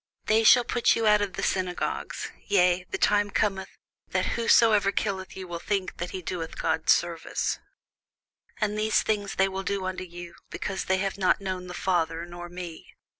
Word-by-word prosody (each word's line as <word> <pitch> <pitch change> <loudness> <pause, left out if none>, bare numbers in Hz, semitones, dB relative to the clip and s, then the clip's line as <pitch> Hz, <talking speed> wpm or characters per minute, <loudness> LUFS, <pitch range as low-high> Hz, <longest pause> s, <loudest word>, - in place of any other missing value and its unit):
They 220 +1 +3
shall 245 +2 +7
put 240 0 +2
you 230 - 0
out 210 -1 +5
of 200 -2 -2
the - - -4
synagogues: 185 -2 -2 0.2
yea, 180 -2 +3
the - - -2
time 205 0 +3
cometh, 195 -1 0 0.4
that - - 0
whosoever 220 -3 +4
killeth 195 -3 -3
you 190 -1 -6
will 170 -1 -5
think 195 0 -2
that 175 +1 -4
he 185 - -6
doeth 165 -1 -5
God 160 0 -1
service. 170 -1 +1 1.0
And 215 0 0
these 215 0 +2
things 205 -2 -1
will 190 0 +1
they 200 +1 -1
do 190 -1 -4
unto 185 0 -3
you, 175 -1 -9 0.2
because 190 - -4
they 190 - +2
have 195 0 -2
not 185 +1 +3
known 185 -2 -4
the 180 - -7
Father, 170 -3 0
nor 175 0 -9
me. 175 -2 -9
190 Hz, 180 wpm, -27 LUFS, 175-205 Hz, 1.0 s, shall